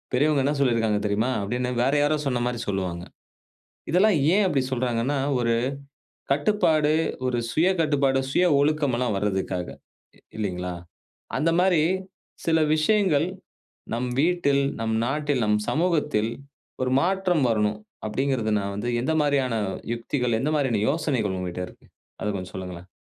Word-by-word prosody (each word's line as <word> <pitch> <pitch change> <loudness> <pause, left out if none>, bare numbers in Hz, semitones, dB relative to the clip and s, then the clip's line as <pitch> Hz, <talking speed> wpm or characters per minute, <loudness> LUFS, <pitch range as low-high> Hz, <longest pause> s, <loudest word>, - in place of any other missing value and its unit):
"பெரியவங்க 145 +2 +3
என்ன 145 +2 +1
சொல்லிருக்காங்க 115 -5 +2
தெரியுமா?" 105 +5 +1
அப்பிடீன்னு 125 +5 -2
வேற 135 +2 +2
யாரோ 150 +1 +2
சொன்னமாரி 120 -2 -1
சொல்வாங்க. 90 -3 -2 0.9
இதெல்லாம் 185 +2 +4 0.2
ஏன் 210 - +4
அப்புடி 140 -7 +1
சொல்றாங்கன்னா, 125 +2 0 0.2
ஒரு 115 -1 +1 0.8
கட்டுப்பாடு, 155 -1 +2 0.4
ஒரு 125 -1 0
சுய 165 +8 +3
கட்டுப்பாடு, 140 -4 +2
சுய 180 - +3 0.2
ஒழுக்கம் 145 -2 +1
எல்லாம் 125 -4 0
வர்றதுக்காக. 95 -3 -2 0.5
இ - - -22 0.2
இல்லீங்களா? 90 -4 -3 0.6
அந்தமாரி 170 +1 +3 0.6
சில 165 -1 +3 0.2
விஷயங்கள் 160 -1 +2 0.7
நம் 125 +2 -2
வீட்டில், 150 -4 +2 0.2
நம் 110 0 -1
நாட்டில், 145 -1 0
நம் 105 0 +2
சமூகத்தில் 150 -10 +1 0.5
ஒரு 130 - 0
மாற்றம் 180 -3 +1
வரணும் 105 -1 +1 0.3
அப்பிடீங்கிறது 120 -1 0
நான் 100 0 -3
வந்து 110 +4 -3
எந்த 140 - 0
மாரியான 140 -4 +1 0.4
யுக்திகள், 120 -1 -1
எந்த 150 - 0
மாரியான 125 -8 +1
யோசனைகள் 135 - 0
உங்ககிட்ட 90 0 -4
இருக்கு. - - -19 0.4
அத - - -2
கொஞ்சம் 90 -2 -6
சொல்லுங்களேன். 90 -1 -7
130 Hz, 130 wpm, -25 LUFS, 110-150 Hz, 0.9 s, இதெல்லாம்